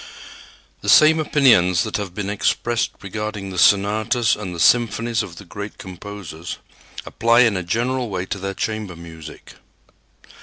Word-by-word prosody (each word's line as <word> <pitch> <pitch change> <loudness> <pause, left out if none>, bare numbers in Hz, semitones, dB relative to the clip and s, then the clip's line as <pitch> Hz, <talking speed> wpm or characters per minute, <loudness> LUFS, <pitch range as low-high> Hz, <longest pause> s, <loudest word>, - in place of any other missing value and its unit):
The - - -3
same 160 +1 +6
opinions 120 - +3
that 110 - -3
have 100 -4 -6
been 100 -1 -3
expressed 115 +3 0
regarding 105 0 -5
the 90 - -4
sonatas 105 +5 +3
and 95 -4 -6
the - - -7
symphonies 115 +2 +2
of 85 - -8
the 100 - -12
great 100 +4 -8
composers 90 -3 -8 0.5
apply 115 +1 +3
in 115 -4 +3
a 90 - -1
general 120 +7 -1
way 95 -2 -3
to 100 - -5
their 95 +1 -4
chamber 110 -5 -4
music. 80 -2 -12
105 Hz, 150 wpm, -21 LUFS, 90-115 Hz, 0.5 s, same